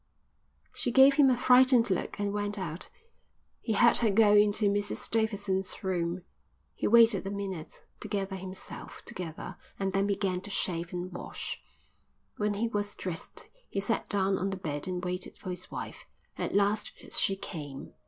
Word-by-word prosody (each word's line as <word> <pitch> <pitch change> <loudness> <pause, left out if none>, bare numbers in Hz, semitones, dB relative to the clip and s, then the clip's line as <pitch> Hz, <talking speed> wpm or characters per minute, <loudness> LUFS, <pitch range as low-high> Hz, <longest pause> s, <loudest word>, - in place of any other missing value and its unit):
She - - -1
gave 270 +2 +7
him 280 -3 +6
a 250 - +3
frightened 250 -2 +5
look 185 - -2
and 205 0 -1
went 205 0 -2
out. 175 -3 -5 0.7
He 225 - -1
heard 235 +3 +5
her 230 - +3
go 210 +1 +5
into 210 +1 +4
Mrs 205 0 +1
Davidson's 205 -4 0
room. 175 -1 -1 0.5
He - - -2
waited 230 -3 +5
a - - -2
minute 195 -5 -6 0.2
to - - -7
gather 195 -2 -2
himself 185 0 -8
together 180 -4 -7 0.2
and 195 -1 -2
then 195 +1 +2
began 195 -2 -1
to 205 - -10
shave 175 -3 -1
and 180 +1 -4
wash. 180 - -5 0.8
When 210 -1 0
he 225 +3 0
was 205 -2 -2
dressed 175 -3 -4 0.2
he 200 - -2
sat 210 +3 -1
down 195 -1 +1
on 195 - -1
the 190 - -4
bed 150 -3 -4
and 180 -1 -3
waited 180 +1 -4
for 185 - -6
his 180 +1 -6
wife. - - -7 0.3
At - - -3
last 205 +1 +2 0.2
she 195 - +3
came. 145 -8 -7
200 Hz, 170 wpm, -29 LUFS, 185-210 Hz, 0.8 s, gave